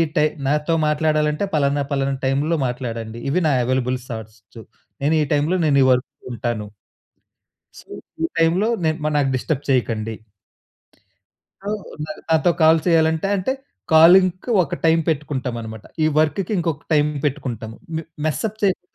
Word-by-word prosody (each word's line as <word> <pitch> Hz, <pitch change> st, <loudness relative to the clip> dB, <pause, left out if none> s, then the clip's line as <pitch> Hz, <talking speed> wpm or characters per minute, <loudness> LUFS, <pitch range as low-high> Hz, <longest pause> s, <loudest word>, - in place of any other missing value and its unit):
టై 150 Hz, -, +4 dB, 0.2 s
నాతో 150 Hz, +3 st, +1 dB
మాట్లాడాలంటే 150 Hz, +2 st, +1 dB
పలానా, 140 Hz, -1 st, +1 dB
పలానా 140 Hz, 0 st, 0 dB
టైమ్‌లో 145 Hz, +5 st, +1 dB
మాట్లాడండి. 115 Hz, -2 st, -5 dB
ఇవి 180 Hz, +6 st, +1 dB
నా 145 Hz, -, +3 dB
అవైలబుల్ 130 Hz, 0 st, 0 dB
స్లాట్సు. 110 Hz, -1 st, -10 dB, 0.4 s
నేను 155 Hz, +3 st, +3 dB
ఈ -, -, +3 dB
టైమ్‌లో 150 Hz, +5 st, +1 dB
నేను 140 Hz, -2 st, +3 dB
ఈ -, -, +4 dB
వర్క్ 125 Hz, +2 st, +1 dB, 0.2 s
ఉంటాను." 115 Hz, -3 st, -3 dB, 1.1 s
"సో, -, -, -16 dB, 0.4 s
ఈటైమ్‌లో 165 Hz, +6 st, +1 dB, 0.2 s
నె 160 Hz, -, +3 dB, 0.3 s
నాకు 135 Hz, -2 st, +2 dB
డిస్టర్బ్ 140 Hz, +2 st, -2 dB
చేయకండి." 115 Hz, -4 st, 0 dB, 1.5 s
సో, 200 Hz, -, -5 dB, 0.4 s
న -, -, -18 dB, 0.2 s
నాతో 160 Hz, +2 st, +3 dB
కాల్ 160 Hz, +1 st, +6 dB
చేయాలంటే 160 Hz, +1 st, +2 dB
అంటే 185 Hz, +8 st, -1 dB, 0.4 s
కాలింగ్‌కి 180 Hz, +6 st, +6 dB
ఒక 150 Hz, -, -4 dB
టైమ్ 165 Hz, 0 st, +4 dB
పెట్టుకుంటాం 140 Hz, -5 st, -2 dB
అన్నమాట. 110 Hz, -1 st, -8 dB, 0.2 s
ఈ -, -, +4 dB
వర్క్‌కి 165 Hz, +6 st, 0 dB
ఇంకొక 165 Hz, -3 st, -2 dB
టైమ్ 150 Hz, 0 st, +3 dB, 0.2 s
పెట్టుకుంటాము. 120 Hz, -6 st, -3 dB, 0.2 s
మె -, -, -3 dB, 0.2 s
మెస్ 155 Hz, -, -1 dB
అప్ 215 Hz, +1 st, -11 dB
చేయకుండా 185 Hz, -2 st, 0 dB
150 Hz, 140 wpm, -21 LUFS, 125-160 Hz, 1.5 s, కాల్